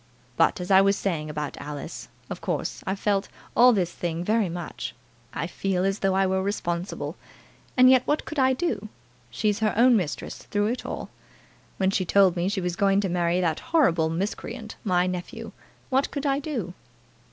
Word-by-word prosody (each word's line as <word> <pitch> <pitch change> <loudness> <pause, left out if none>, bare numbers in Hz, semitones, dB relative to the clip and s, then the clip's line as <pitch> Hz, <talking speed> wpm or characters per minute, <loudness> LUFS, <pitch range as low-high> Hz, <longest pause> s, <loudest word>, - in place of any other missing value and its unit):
But, - - +3
as 180 +2 -4
I 190 0 +8
was 200 +1 +3
saying 165 -7 -2
about 150 -1 -4
Alice, 145 -1 -7 0.2
of - - -6
course - - -3
I've 190 +1 -1
felt 200 -1 0 0.3
all 250 +1 +8
this 185 -6 +1
thing 170 -1 -3
very 215 0 +1
much. 175 0 -6 0.4
I 150 - -3
feel 185 +1 -1
as 195 +1 0
though 195 -1 +1
I 195 0 +3
were 190 0 +1
responsible, 180 -2 -3 0.6
and 255 0 +8
yet 255 -1 +5
what 295 - +1
could 310 - -4
I 260 0 +4
do? 230 - -2 0.4
She's 210 - 0
her 215 -2 +1
own 245 +1 +6
mistress 180 -9 -2
through 205 0 -1
it 250 - -5
all. - - -5 0.7
When 190 0 +2
she 195 - +1
told 190 0 +4
me 175 +2 0
she 200 -1 -1
was 175 -1 -2
going 195 0 +3
to 195 - -1
marry 175 0 +1
that 165 -3 0
horrible 235 - +2
miscreant, 200 +5 -4
my 180 -3 +2
nephew, 180 -1 -5 0.4
what 265 +2 +2
could 285 0 -4
I 275 0 +2
do?" 250 - -4
195 Hz, 185 wpm, -26 LUFS, 175-220 Hz, 0.7 s, I